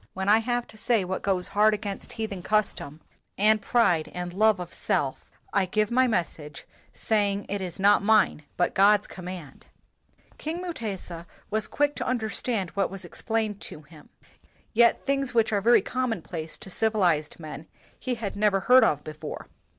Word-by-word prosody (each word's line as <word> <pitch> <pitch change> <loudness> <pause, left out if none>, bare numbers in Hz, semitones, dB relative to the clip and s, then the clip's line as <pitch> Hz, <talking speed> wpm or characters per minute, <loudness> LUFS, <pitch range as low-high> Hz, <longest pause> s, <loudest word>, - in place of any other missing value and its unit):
When 190 +1 -3
I 215 +2 +6
have 240 +1 -1
to 220 - -14
say 215 -3 +1
what 190 +1 -3
goes 185 -2 -1
hard 210 +1 +4
against 205 -1 -6
heathen 215 -5 -4
custom 180 -7 -1 0.4
and 215 +1 +4
pride 180 -9 +2
and 180 0 -4
love 215 +1 +3
of 180 -1 -7
self, - - -1 0.2
I 190 - +2
give 215 +3 0
my 255 +1 +4
message, 155 - -3 0.3
saying 205 -2 0
it 200 0 -2
is 180 0 -6
not 200 +1 +5
mine 210 -6 +3 0.2
but 175 - +1
God's 205 +1 +5
command." 180 -6 -9 0.7
King 320 +3 -4
Mutesa 200 - -6 0.2
was 215 0 0
quick 290 0 +1
to 245 - -3
understand 220 -4 -1
what 200 -1 0
was 195 -1 -8
explained 215 +3 -3
to 150 - -8
him; 150 0 -17 0.6
yet 235 +1 +4
things 275 -3 -1
which 225 -1 +3
are 200 - +2
very 235 +4 +5
commonplace 185 -10 -3
to 190 - -10
civilized 180 -10 +1
men 155 -1 -8 0.3
he 255 -1 -2
had 215 -4 -5
never 200 -1 +2
heard 255 +4 +6
of 150 -1 +2
before. 155 0 -8
205 Hz, 165 wpm, -26 LUFS, 180-225 Hz, 0.7 s, I